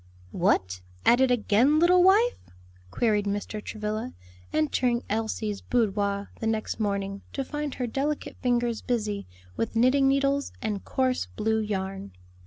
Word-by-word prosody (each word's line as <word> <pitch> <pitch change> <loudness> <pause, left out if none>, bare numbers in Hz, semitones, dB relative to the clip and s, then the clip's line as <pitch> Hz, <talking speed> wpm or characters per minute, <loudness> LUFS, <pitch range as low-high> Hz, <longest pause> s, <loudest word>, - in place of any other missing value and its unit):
"What! 90 -1 +1 0.2
at 240 +2 +5
it 265 - +4
again, 245 +4 +3
little 355 +2 +5
wife?" 415 +7 +4 0.5
queried 210 - +1
Mr. 205 +1 -3
Travilla, 215 +3 -4 0.4
entering 235 - +1
Elsie's 215 -1 -2
boudoir 200 -4 0
the 225 - -2
next 220 0 -2
morning, 200 -1 -2
to 275 - -2
find 295 0 -4
her 250 - -2
delicate 280 +5 -3
fingers 240 -2 +1
busy 215 -5 -2 0.3
with 225 - -2
knitting 255 +4 +4
needles 275 +1 +1
and 210 -3 -3
coarse 255 - 0
blue 220 - -1
yarn. 195 - -4
225 Hz, 135 wpm, -27 LUFS, 205-260 Hz, 0.5 s, at